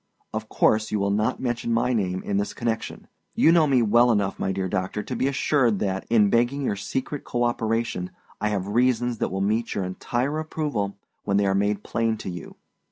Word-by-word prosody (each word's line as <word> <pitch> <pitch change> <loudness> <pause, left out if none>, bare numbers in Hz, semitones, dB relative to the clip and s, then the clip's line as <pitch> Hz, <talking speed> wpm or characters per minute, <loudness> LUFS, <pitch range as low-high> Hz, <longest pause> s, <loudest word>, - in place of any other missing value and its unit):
Of - - -4
course 110 0 +2
you 105 - +1
will 100 0 +1
not 110 +5 0
mention 120 -2 -2
my 120 +2 +2
name 95 -5 -1
in 100 - -1
this 100 - -2
connection. 115 -1 -3 0.3
You 160 - +5
know 165 -2 +5
me 130 -4 +3
well 120 +3 +5
enough, 100 -3 0
my 95 - 0
dear 95 0 -2
doctor, 95 +2 -2
to - - -5
be 130 - +1
assured 135 -5 +2
that, 95 -1 -2
in 105 -3 +4
begging 120 +4 +2
your 105 - 0
secret 130 +8 -4
cooperation, 115 -5 -1 0.3
I 105 - +1
have 100 -3 -1
reasons 120 +2 +1
that - - 0
will 95 +1 -3
meet 110 +4 0
your 100 - -1
entire 120 +10 -2
approval 145 -11 -3 0.3
when 100 - +1
they 100 - +3
are 95 - +2
made 100 +1 0
plain 115 -1 0
to 95 - -6
you. 85 -2 -8
110 Hz, 205 wpm, -25 LUFS, 100-120 Hz, 0.3 s, You